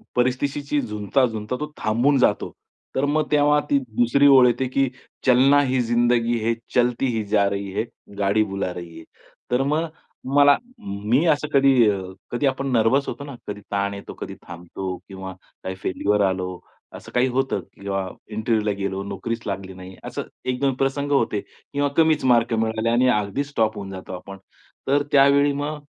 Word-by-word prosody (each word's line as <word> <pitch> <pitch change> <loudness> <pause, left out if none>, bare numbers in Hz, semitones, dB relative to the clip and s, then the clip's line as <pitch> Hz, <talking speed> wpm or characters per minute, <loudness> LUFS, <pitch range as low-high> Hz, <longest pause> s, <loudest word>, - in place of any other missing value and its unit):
परिस्थितीशी 140 +4 0
झुंजता, 105 +5 0
झुंजता 110 0 -4
तो 150 0 -5
थांबून 120 +6 +2
जातो. 105 -5 +2 0.4
तर 135 - +2
मग 150 +1 0
तेव्हा 150 0 +4
ती 140 - +4 0.2
दुसरी 120 +4 +4
ओळ 135 -3 +8
येते 125 +2 +1
की 135 -2 +2 0.4
चलना 130 +3 +6
ही 130 0 +2
जिंदगी 120 0 +2
है, 115 - +2 0.2
चलती 125 +1 +2
ही 110 - -1
जा 100 -1 +3
रही 100 -1 -4
है, 100 - 0 0.4
गाडी 100 +2 +3
बुला 100 -3 -3
रही 85 -2 -9
है. - - -11 0.5
तर 125 +1 +2
मग 155 +4 0 0.5
मला 145 0 +7 0.2
मी 105 +10 0
असं 150 -1 +2
कधी 135 0 +5 0.2
अ, 100 -2 -1 0.3
कधी 120 +4 -1
आपण 135 +1 -1
नर्व्हस 125 +4 +3
होतो 140 - -5
ना, 140 -2 -8
कधी 105 0 -5
ताण 100 0 0
येतो, 100 - -8
कधी - - -7
थांबतो 90 +2 -6
किंवा 95 -1 -7 0.3
काही 95 - -4
फेल्युअर 100 +2 0
आलं, 90 -1 -3 0.4
असं - - -13
काही 125 +1 +2
होतं 135 +1 0 0.2
किंवा 95 -1 -2 0.2
इंटरव्ह्यूला 110 0 0
गेलो, 100 -1 -2
नोकरीच 100 +4 -4
लागली 95 -1 -4
नाही. 95 0 -11
असं - - -5 0.3
एक 125 0 -1
दोन 135 -1 +2
प्रसंग 140 +1 -1
होते 115 -6 +2
किंवा 145 0 -4
कमीच 160 -3 +3
मार्क 120 -2 +3
मिळाले 110 0 0
आणि 120 +2 +3
अगदीच 105 +5 0
स्टॉप 110 -6 0
होऊन 100 -1 -6
जातो 95 0 -8
आपण. 95 +2 -8 0.5
तर 140 +2 +3
त्यावेळी 140 +1 +5
मग 145 +1 -4
120 Hz, 175 wpm, -23 LUFS, 100-140 Hz, 0.5 s, ओळ